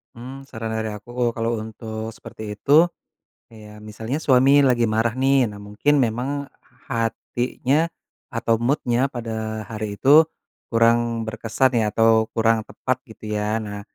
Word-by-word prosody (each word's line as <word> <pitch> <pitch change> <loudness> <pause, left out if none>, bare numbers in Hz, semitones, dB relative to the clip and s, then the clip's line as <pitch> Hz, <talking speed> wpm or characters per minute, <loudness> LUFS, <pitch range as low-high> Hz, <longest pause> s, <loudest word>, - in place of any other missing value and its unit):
Mmm, 130 +3 -9
saran 115 -3 -5
dari 110 0 -2
aku, 105 +3 -13
uh, 120 -1 0
kalau 115 0 -1
untuk 110 0 -6
seperti 105 -1 -8
itu 150 +10 +5 0.6
ya, 105 -1 -13
misalnya 110 +5 -5
suami 135 0 +5
lagi 125 -4 +3
marah 115 +2 0
nih, 135 -1 +3
nah, 105 - -9
mungkin 105 +9 +1
memang 130 +3 0 0.4
hatinya 125 +5 -1 0.4
atau 115 -1 0
mood-nya 125 0 +1
pada 110 -3 -5
hari 105 -1 -5
itu 150 +7 +6 0.4
kurang 115 0 +2
berkesan 115 +3 0
ya, 110 - +1
atau 110 0 +3
kurang 115 0 +3
tepat, 130 0 -2
gitu 110 - -13
ya. 105 +1 0
Nah, 105 -2 -5
115 Hz, 140 wpm, -22 LUFS, 110-130 Hz, 0.6 s, itu